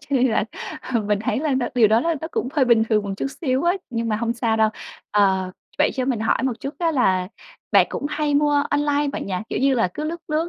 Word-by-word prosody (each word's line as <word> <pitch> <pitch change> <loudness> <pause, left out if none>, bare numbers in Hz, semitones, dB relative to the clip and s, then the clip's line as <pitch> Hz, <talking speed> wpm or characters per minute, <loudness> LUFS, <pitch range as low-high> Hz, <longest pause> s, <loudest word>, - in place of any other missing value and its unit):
cho 300 - -18
nên 255 +1 +3
là, 220 - +1 0.5
ừ, 230 - +3
mình 205 0 0
thấy - - 0
là 300 -4 0
nó 255 -2 0
điều 230 -4 +5
đó 220 +2 +4
là 335 +4 0
nó 320 - -5
cũng 255 - -2
hơi 280 -4 +3
bình 235 -2 +4
thường 215 -2 +2
một 200 - -4
chút - - -2
xíu 260 -3 0
ấy, 350 +3 +2
nhưng 230 -1 -2
mà 215 - +1
hông 230 +1 -1
sao 230 -2 0
đâu. 220 0 +4 0.4
Ờ, 190 -2 +2 0.3
vậy 300 - +4
cho 260 -2 -1
mình 250 -5 -1
hỏi 225 - +1
một 260 -2 +1
chút 275 +2 -5
á 335 -2 +1
là 185 -9 +2 0.4
bạn - - +6
cũng 285 - -4
hay 300 -1 -1
mua 290 0 +3
online 290 0 +1
bạn - - -4
nhỉ? 190 - -3
Kiểu - - -2
như 270 0 +3
là, 225 -6 +2
cứ 305 - -4
lướt 335 +2 -4
lướt 315 +3 0
255 Hz, 270 wpm, -22 LUFS, 220-295 Hz, 0.5 s, bạn